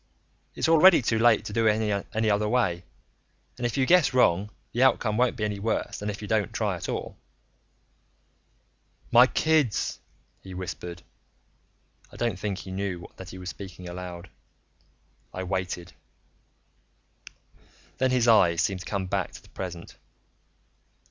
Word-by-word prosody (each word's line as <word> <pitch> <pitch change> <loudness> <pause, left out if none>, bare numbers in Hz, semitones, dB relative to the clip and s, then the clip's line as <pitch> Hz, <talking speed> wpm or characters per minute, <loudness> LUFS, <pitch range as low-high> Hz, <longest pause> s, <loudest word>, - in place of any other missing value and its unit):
It's - - 0
already 165 -1 +7
too 115 0 +1
late 115 -1 +4
to 105 - -6
do 115 0 +2
it 105 -2 +1
any 110 0 +2
other 105 +1 +1
way. 95 -8 +1 0.7
And 120 - -1
if 120 - -4
you 130 - +3
guess 170 -4 +4
wrong, 100 -5 +3 0.2
the 120 - -1
outcome 120 -4 +3
won't 125 +2 +2
be 105 - -3
any 105 -1 -2
worse 110 +3 -2
than 105 - -3
if 105 +1 -6
you - - -5
don't 105 -2 0
try - - -1
at - - -6
all." - - -4 1.9
"My 125 +2 +8
kids," 155 -6 +1 0.4
he 95 -1 -10
whispered. 90 -1 -6 1.1
I - - -14
don't 115 -6 -2
think 100 -2 -3
he 95 - -8
knew 95 -2 -4
that 95 -1 -9
he 95 - -9
was 90 0 -6
speaking 95 -2 -10
aloud. 90 0 -8 1.0
I 95 - -3
waited. 90 -2 -4 2.1
Then 130 0 +3
his 125 -2 +2
eyes 90 -7 +5
seemed 95 +2 0
to - - -9
come 100 -2 -2
back 90 - -2
to - - -11
the - - -19
present. 90 -2 -7
105 Hz, 155 wpm, -26 LUFS, 90-120 Hz, 2.1 s, My